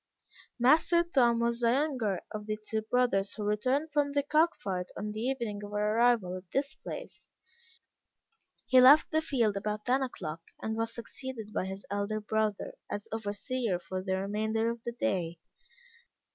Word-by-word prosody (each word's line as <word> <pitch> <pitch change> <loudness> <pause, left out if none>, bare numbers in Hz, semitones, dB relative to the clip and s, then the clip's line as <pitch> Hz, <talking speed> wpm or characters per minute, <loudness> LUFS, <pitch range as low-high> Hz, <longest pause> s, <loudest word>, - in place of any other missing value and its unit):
Master 310 +7 +4
Tom 250 -8 +3
was 235 0 +1
the 235 -1 +3
younger 250 - 0
of 210 0 -6
the 215 0 -1
two 220 +1 -3
brothers 220 -4 +1
who 215 - -4
returned 255 +9 0
from 285 -1 +1
the 285 0 +2
cock 310 +4 +3
fight 180 -2 -3
on 210 - -3
the 215 - -5
evening 230 -4 -2
of 205 - -7
our 210 +1 +1
arrival 230 -6 +3
at 185 -1 -13
this 280 +2 0
place, - - -9 1.3
he 255 +2 +6
left 285 +5 +7
the 315 - +2
field 235 -9 +1
about 210 +1 -3
ten 260 +2 +2
o'clock, 165 -11 -4 0.2
and 220 0 -3
was 225 0 -1
succeeded 235 -2 -7
by - - -1
his 190 +1 -6
elder 205 +1 -1
brother, 215 -1 -1 0.2
as 205 0 -4
overseer 220 0 -2
for 185 +1 -5
the 190 0 -1
remainder 220 +3 0
of 235 0 -7
the 235 - -2
day. 185 -9 -1
220 Hz, 170 wpm, -30 LUFS, 205-255 Hz, 1.3 s, left